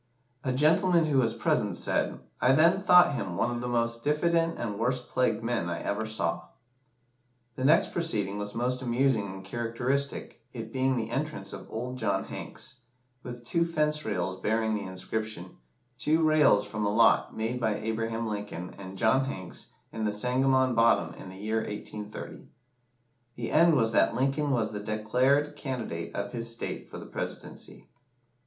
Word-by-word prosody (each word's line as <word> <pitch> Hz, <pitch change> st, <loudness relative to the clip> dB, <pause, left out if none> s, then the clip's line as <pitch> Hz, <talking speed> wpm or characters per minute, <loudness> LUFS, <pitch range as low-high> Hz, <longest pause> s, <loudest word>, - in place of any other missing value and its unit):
A 130 Hz, -, 0 dB
gentleman 165 Hz, +5 st, +4 dB
who 145 Hz, -3 st, +2 dB
was 115 Hz, -3 st, +1 dB
present -, -, +1 dB
said -, -, 0 dB, 0.2 s
"I 130 Hz, -, +5 dB
then 165 Hz, +6 st, +4 dB
thought 180 Hz, -5 st, +6 dB
him 95 Hz, -9 st, -3 dB
one 120 Hz, -, +1 dB
of 120 Hz, 0 st, -3 dB
the 125 Hz, -, -3 dB
most 115 Hz, -1 st, 0 dB
diffident 165 Hz, +3 st, +1 dB
and 105 Hz, -4 st, -4 dB
worst 125 Hz, +2 st, 0 dB
plagued 115 Hz, -3 st, +1 dB
men 115 Hz, -7 st, -1 dB
I 85 Hz, -, -3 dB
ever 110 Hz, +2 st, -2 dB
saw." 110 Hz, 0 st, -2 dB, 1.1 s
The 130 Hz, -, -2 dB
next 155 Hz, +4 st, +4 dB
proceeding 105 Hz, -, 0 dB
was 105 Hz, +1 st, -5 dB
most 125 Hz, +2 st, 0 dB
amusing 120 Hz, -3 st, +1 dB
and 95 Hz, 0 st, -8 dB
characteristic, 120 Hz, +6 st, -2 dB
it 115 Hz, -2 st, -7 dB
being 130 Hz, 0 st, +1 dB
the 115 Hz, -1 st, -3 dB
entrance 135 Hz, -8 st, -3 dB
of -, -, -9 dB
"Old 125 Hz, +3 st, -5 dB
John 100 Hz, -4 st, 0 dB
Hanks," 130 Hz, -, -6 dB, 0.4 s
with 120 Hz, -1 st, -8 dB
two 170 Hz, +7 st, +1 dB
fence 150 Hz, -2 st, 0 dB
rails 95 Hz, -4 st, -2 dB
bearing 110 Hz, +1 st, +1 dB
the 105 Hz, -, -2 dB
inscription 95 Hz, 0 st, -4 dB, 0.4 s
Two 160 Hz, +4 st, +2 dB
Rails 150 Hz, -10 st, +5 dB
from 105 Hz, +1 st, -4 dB
a 100 Hz, -, +2 dB
lot 115 Hz, +2 st, +4 dB
made 115 Hz, +3 st, -2 dB
by 110 Hz, -3 st, +1 dB
Abraham 115 Hz, +1 st, -2 dB
Lincoln 105 Hz, -4 st, -5 dB
and 95 Hz, 0 st, -8 dB
John 130 Hz, +6 st, +3 dB
Hanks 95 Hz, -9 st, -6 dB, 0.2 s
in 110 Hz, -1 st, -3 dB
the 105 Hz, -, +1 dB
Sangamon 130 Hz, +3 st, +2 dB
bottom 115 Hz, 0 st, +3 dB
in -, -, -9 dB
the 95 Hz, -, -10 dB
year 110 Hz, +3 st, -1 dB
1830. 105 Hz, -1 st, -6 dB, 0.9 s
The 120 Hz, -1 st, -4 dB
end 165 Hz, +1 st, +5 dB
was 115 Hz, -4 st, +2 dB
that 115 Hz, -, +3 dB
Lincoln 135 Hz, +3 st, +1 dB
was 115 Hz, -5 st, +1 dB
the 105 Hz, -, -4 dB
declared 125 Hz, +8 st, +1 dB
candidate 120 Hz, -, -5 dB
of 100 Hz, 0 st, -3 dB
his 115 Hz, -1 st, -3 dB
state 115 Hz, -, -5 dB
for -, -, -8 dB
the -, -, -8 dB
Presidency. -, -, -7 dB
115 Hz, 170 wpm, -28 LUFS, 105-135 Hz, 1.1 s, thought